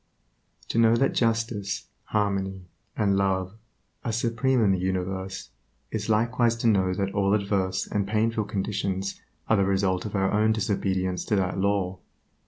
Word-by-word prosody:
To -, -, +1 dB
know 115 Hz, 0 st, +5 dB
that 135 Hz, +3 st, +2 dB
justice, 115 Hz, -4 st, 0 dB, 0.2 s
harmony, 95 Hz, -3 st, -1 dB, 0.3 s
and 100 Hz, -3 st, +2 dB
love 95 Hz, -1 st, 0 dB, 0.5 s
are 115 Hz, -, -1 dB
supreme 115 Hz, +2 st, +1 dB
in 100 Hz, -, +4 dB
the 95 Hz, -, +1 dB
universe 95 Hz, +1 st, -3 dB, 0.4 s
is 110 Hz, 0 st, -3 dB
likewise 115 Hz, +2 st, +2 dB
to 115 Hz, 0 st, -1 dB
know 95 Hz, -4 st, +3 dB
that 100 Hz, +1 st, -2 dB
all 100 Hz, 0 st, +2 dB
adverse 100 Hz, -2 st, 0 dB
and 100 Hz, -2 st, -1 dB
painful 110 Hz, +1 st, +1 dB
conditions 100 Hz, -2 st, -2 dB, 0.3 s
are 110 Hz, -, +4 dB
the 100 Hz, -, +3 dB
result 95 Hz, -1 st, +1 dB
of 105 Hz, -, -4 dB
our 95 Hz, 0 st, +1 dB
own 110 Hz, +1 st, +3 dB
disobedience 95 Hz, -4 st, -1 dB
to 105 Hz, -, +1 dB
that 95 Hz, -1 st, 0 dB
Law. 95 Hz, -2 st, 0 dB
100 Hz, 155 wpm, -26 LUFS, 95-110 Hz, 0.5 s, know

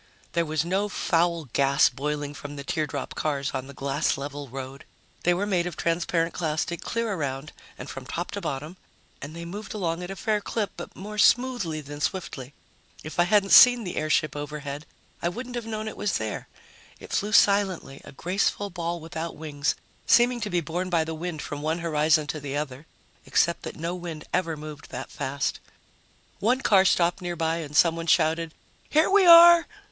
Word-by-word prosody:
There 170 Hz, -1 st, +1 dB
was 155 Hz, 0 st, 0 dB
no 195 Hz, +4 st, 0 dB
foul 170 Hz, -3 st, +1 dB
gas 140 Hz, 0 st, +4 dB
boiling 145 Hz, +1 st, -3 dB
from 145 Hz, 0 st, -8 dB
the 140 Hz, -, -6 dB
teardrop 155 Hz, 0 st, -3 dB
cars 140 Hz, -2 st, -2 dB
on 130 Hz, -1 st, -4 dB
the 140 Hz, -, -10 dB
glass 140 Hz, +2 st, 0 dB
level 145 Hz, +1 st, -6 dB
road. 135 Hz, +2 st, -7 dB, 0.4 s
They 175 Hz, -, +4 dB
were 195 Hz, +3 st, -1 dB
made 180 Hz, -4 st, 0 dB
of 175 Hz, -, -6 dB
transparent 170 Hz, 0 st, 0 dB
plastic 165 Hz, +1 st, -2 dB
clear 230 Hz, -2 st, -2 dB
around 140 Hz, -3 st, -4 dB, 0.3 s
and 125 Hz, -, -8 dB
from 135 Hz, -2 st, -8 dB
top 175 Hz, +1 st, -4 dB
to 200 Hz, -, -5 dB
bottom, 155 Hz, +2 st, -5 dB, 0.4 s
and 145 Hz, +3 st, -8 dB
they 170 Hz, 0 st, -7 dB
moved 205 Hz, +5 st, -7 dB
along 170 Hz, -4 st, -2 dB
at 180 Hz, -, -6 dB
a 195 Hz, -, -5 dB
fair 210 Hz, +2 st, 0 dB
clip, 205 Hz, -1 st, -2 dB
but -, -, -9 dB
more 210 Hz, +2 st, -7 dB
smoothly 240 Hz, -12 st, +3 dB
than 145 Hz, +1 st, -9 dB
swiftly. 145 Hz, -8 st, -4 dB, 0.5 s
If 155 Hz, +2 st, -7 dB
I 175 Hz, -, +6 dB
hadn't 200 Hz, 0 st, +3 dB
seen 245 Hz, -2 st, +9 dB
the 180 Hz, -, -5 dB
airship 155 Hz, 0 st, +1 dB
overhead, 145 Hz, 0 st, -6 dB, 0.3 s
I 170 Hz, -, +1 dB
wouldn't 245 Hz, +7 st, -7 dB
have 240 Hz, -2 st, -4 dB
known 215 Hz, -1 st, -4 dB
it 220 Hz, -, -5 dB
was 205 Hz, -3 st, -1 dB
there. 110 Hz, -1 st, -4 dB, 0.5 s
It -, -, -10 dB
flew 205 Hz, +1 st, 0 dB
silently, 195 Hz, -10 st, +3 dB
a -, -, -11 dB
graceful 195 Hz, +5 st, -1 dB
ball 170 Hz, -1 st, -3 dB
without 165 Hz, 0 st, -6 dB
wings, 150 Hz, -2 st, -2 dB, 0.3 s
seeming 240 Hz, 0 st, +4 dB
to 210 Hz, -, -2 dB
be 175 Hz, -2 st, +1 dB
borne 175 Hz, +4 st, -3 dB
by 170 Hz, -3 st, +2 dB
the 160 Hz, +1 st, -5 dB
wind 160 Hz, -1 st, -5 dB
from 145 Hz, 0 st, -6 dB
one 155 Hz, +2 st, 0 dB
horizon 155 Hz, -2 st, +2 dB
to 155 Hz, +1 st, -4 dB
the 145 Hz, 0 st, -4 dB
other, 145 Hz, 0 st, -5 dB, 0.4 s
except 170 Hz, -1 st, +2 dB
that -, -, -7 dB
no 170 Hz, +2 st, -3 dB
wind 170 Hz, -4 st, -6 dB
ever 165 Hz, -3 st, 0 dB
moved 150 Hz, -1 st, -9 dB
that -, -, -7 dB
fast. 135 Hz, +1 st, -2 dB, 0.8 s
One 250 Hz, +5 st, +2 dB
car 195 Hz, -5 st, +5 dB
stopped 175 Hz, 0 st, +2 dB
nearby 165 Hz, -2 st, -1 dB
and 150 Hz, -3 st, -6 dB
someone 165 Hz, 0 st, +3 dB
shouted, 160 Hz, 0 st, +2 dB, 0.3 s
"Here 310 Hz, +2 st, +4 dB
we 390 Hz, -1 st, +5 dB
are!" 340 Hz, 0 st, +9 dB
165 Hz, 190 wpm, -26 LUFS, 150-195 Hz, 0.8 s, seen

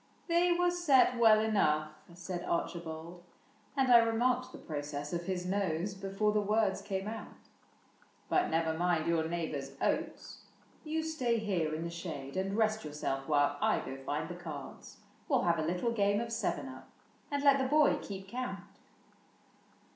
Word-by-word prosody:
'' -, -, -34 dB
They 345 Hz, +1 st, +3 dB
were 355 Hz, 0 st, +3 dB
set 295 Hz, -8 st, +4 dB
well 220 Hz, -2 st, +7 dB
enough," 155 Hz, -9 st, +2 dB, 0.2 s
said 180 Hz, 0 st, -5 dB
Archibald, 170 Hz, 0 st, -4 dB, 0.3 s
— 215 Hz, +6 st, -31 dB
And 265 Hz, -2 st, +3 dB
I 240 Hz, -, +10 dB
remarked 245 Hz, +3 st, +1 dB
the -, -, -9 dB
process 145 Hz, -1 st, -5 dB
of 170 Hz, 0 st, -2 dB
his 180 Hz, -1 st, -2 dB
nose 190 Hz, -1 st, -1 dB
Before 195 Hz, +2 st, -1 dB
the 210 Hz, 0 st, +2 dB
words 210 Hz, -1 st, +1 dB
came 195 Hz, -1 st, -3 dB
out; 220 Hz, +1 st, -8 dB, 0.3 s
" -, -, -33 dB
but 365 Hz, -, +2 dB
never 160 Hz, 0 st, +1 dB
mind 170 Hz, -1 st, +1 dB
Your 165 Hz, -1 st, +1 dB
neighbor's 160 Hz, -5 st, -3 dB
oats: -, -, -2 dB, 0.4 s
you 315 Hz, 0 st, -2 dB
stay 260 Hz, -8 st, 0 dB
here 180 Hz, -8 st, -1 dB
in 160 Hz, -, -4 dB
the 170 Hz, -, -4 dB
shade 155 Hz, -6 st, -6 dB
And 195 Hz, +2 st, -1 dB
rest 220 Hz, -1 st, +1 dB
yourself 145 Hz, -3 st, -3 dB
while 145 Hz, -1 st, +2 dB
I -, -, +3 dB
go 135 Hz, -, -6 dB
find 145 Hz, +4 st, -3 dB
the 175 Hz, -, -6 dB
cards. 160 Hz, -6 st, -9 dB, 0.3 s
We -, -, +3 dB
'11 -, -, +1 dB
have 160 Hz, -, -1 dB
a 160 Hz, -, 0 dB
little 180 Hz, +7 st, 0 dB
game 205 Hz, -2 st, +2 dB
of 235 Hz, 0 st, -4 dB
seven 230 Hz, -, -1 dB
up -, -, -10 dB, 0.4 s
And 285 Hz, -1 st, -1 dB
let 280 Hz, -1 st, +6 dB
the 265 Hz, -, +1 dB
boy 300 Hz, +2 st, +4 dB
keep 195 Hz, -1 st, -7 dB
count." 250 Hz, +4 st, -4 dB
190 Hz, 175 wpm, -32 LUFS, 160-230 Hz, 0.4 s, I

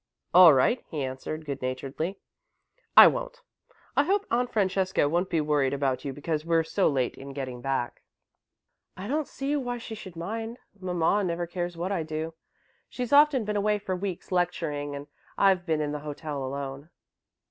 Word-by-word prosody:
"All 180 Hz, -1 st, +10 dB
right," 145 Hz, -, +3 dB
he 150 Hz, -4 st, -3 dB
answered, 135 Hz, +4 st, -5 dB
good 140 Hz, -2 st, -4 dB
naturedly. 135 Hz, +8 st, -3 dB, 0.8 s
"I -, -, +13 dB
won't. -, -, 0 dB, 0.5 s
I 280 Hz, -, +5 dB
hope 400 Hz, +5 st, +1 dB
Aunt 245 Hz, +1 st, +1 dB
Francesca 190 Hz, -5 st, +1 dB
won't 175 Hz, +5 st, 0 dB
be 165 Hz, -, +1 dB
worried 145 Hz, -3 st, +1 dB
about 135 Hz, -2 st, -1 dB
you 140 Hz, -, -3 dB
because 150 Hz, +2 st, -3 dB
we're 165 Hz, 0 st, +2 dB
so 185 Hz, +4 st, +1 dB
late 130 Hz, -4 st, 0 dB
in 135 Hz, +1 st, -9 dB
getting 130 Hz, -3 st, -5 dB
back." 135 Hz, -2 st, -2 dB, 1.0 s
"I 190 Hz, +2 st, -6 dB
don't 300 Hz, +3 st, -1 dB
see 275 Hz, +2 st, -2 dB
why 245 Hz, -4 st, -2 dB
she 230 Hz, -1 st, -8 dB
should 190 Hz, -5 st, -9 dB
mind. 225 Hz, +7 st, -5 dB, 0.2 s
Mamma 180 Hz, +2 st, +1 dB
never 175 Hz, -1 st, -1 dB
cares 175 Hz, 0 st, -4 dB
what 180 Hz, +3 st, -2 dB
I 190 Hz, -4 st, 0 dB
do. 160 Hz, +1 st, -4 dB, 0.6 s
She's 250 Hz, +1 st, -4 dB
often 285 Hz, -5 st, +6 dB
been 210 Hz, 0 st, -2 dB
away 210 Hz, +1 st, +2 dB
for 195 Hz, -2 st, -3 dB
weeks, 185 Hz, -1 st, -5 dB
lecturing, 155 Hz, -5 st, -1 dB
and 140 Hz, 0 st, -7 dB, 0.3 s
I've 190 Hz, -2 st, +3 dB
been 160 Hz, -2 st, +1 dB
in 150 Hz, -1 st, -1 dB
the 150 Hz, -, -3 dB
hotel 145 Hz, -1 st, -5 dB
alone." 140 Hz, +2 st, -5 dB
170 Hz, 175 wpm, -27 LUFS, 145-205 Hz, 1.0 s, I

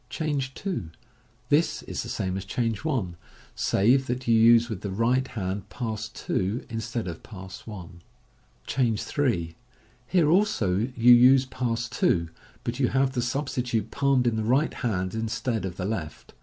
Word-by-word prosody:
Change 140 Hz, -3 st, -2 dB
2. 180 Hz, -, -4 dB, 0.3 s
— 125 Hz, +1 st, -35 dB
This 155 Hz, +4 st, +2 dB
is -, -, -4 dB
the -, -, -7 dB
same 95 Hz, -1 st, -2 dB
as 95 Hz, -, -3 dB
Change 115 Hz, +1 st, -2 dB
1, 120 Hz, -, -1 dB, 0.4 s
save 130 Hz, +7 st, +2 dB
that 125 Hz, +1 st, -3 dB
you 115 Hz, -, +4 dB
use 115 Hz, +1 st, +6 dB
with 110 Hz, -6 st, -5 dB
the 100 Hz, -, -4 dB
right 120 Hz, +6 st, +1 dB
hand 100 Hz, -3 st, -4 dB
Pass 110 Hz, -2 st, -4 dB
2 105 Hz, +1 st, -2 dB
instead 115 Hz, -1 st, -3 dB
of 85 Hz, -2 st, -6 dB
Pass 95 Hz, +2 st, -10 dB
1. 90 Hz, -5 st, -9 dB, 0.6 s
Change 120 Hz, -5 st, 0 dB
3. 90 Hz, -, -1 dB, 0.3 s
— 125 Hz, +3 st, -33 dB
Here 175 Hz, -5 st, +3 dB
also 170 Hz, -, +2 dB, 0.2 s
you 120 Hz, +1 st, +8 dB
use 130 Hz, +2 st, +6 dB
Pass 120 Hz, -2 st, -2 dB
2, 85 Hz, -7 st, +1 dB, 0.3 s
but 120 Hz, +2 st, -3 dB
you 130 Hz, -, +3 dB
have 135 Hz, +1 st, +1 dB
the 125 Hz, -, 0 dB
substitute 120 Hz, -4 st, -2 dB
palmed 140 Hz, -3 st, +2 dB
in 115 Hz, -2 st, +1 dB
the 110 Hz, -, -1 dB
right 130 Hz, +7 st, +2 dB
hand 95 Hz, -6 st, -2 dB
instead 110 Hz, 0 st, -2 dB
of 90 Hz, -1 st, -5 dB
the 90 Hz, -, -3 dB
left. 95 Hz, -7 st, -5 dB
115 Hz, 170 wpm, -26 LUFS, 100-130 Hz, 0.6 s, you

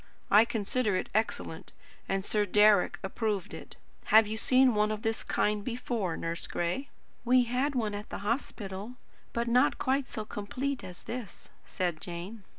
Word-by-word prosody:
I 210 Hz, +2 st, +8 dB
consider 225 Hz, -1 st, 0 dB
it -, -, -2 dB
excellent, 220 Hz, +2 st, -2 dB, 0.4 s
and 195 Hz, 0 st, 0 dB
Sir 210 Hz, -1 st, +1 dB
Deryck 210 Hz, 0 st, +5 dB
approved 205 Hz, 0 st, -2 dB
it. -, -, -9 dB, 0.3 s
Have 220 Hz, +1 st, +7 dB
you 215 Hz, +1 st, -3 dB
seen 255 Hz, +3 st, +4 dB
one 210 Hz, 0 st, +2 dB
of 215 Hz, +1 st, -4 dB
this 225 Hz, -1 st, 0 dB
kind 210 Hz, 0 st, 0 dB
before, 230 Hz, -7 st, -2 dB
Nurse 165 Hz, +1 st, -4 dB
Gray?" 175 Hz, +12 st, -2 dB, 0.3 s
"We 250 Hz, +1 st, +5 dB
had 255 Hz, +4 st, 0 dB
one 220 Hz, -4 st, 0 dB
at 205 Hz, +1 st, -6 dB
the -, -, -4 dB
hospital, 210 Hz, -2 st, -3 dB, 0.4 s
but 235 Hz, 0 st, -1 dB
not 245 Hz, +2 st, +3 dB
quite 265 Hz, +1 st, 0 dB
so 215 Hz, -, -5 dB
complete 250 Hz, +7 st, -3 dB
as 180 Hz, -1 st, -9 dB
this," 230 Hz, -6 st, -7 dB
said 175 Hz, -4 st, -2 dB
Jane. 180 Hz, +5 st, -6 dB
215 Hz, 160 wpm, -30 LUFS, 200-245 Hz, 0.4 s, I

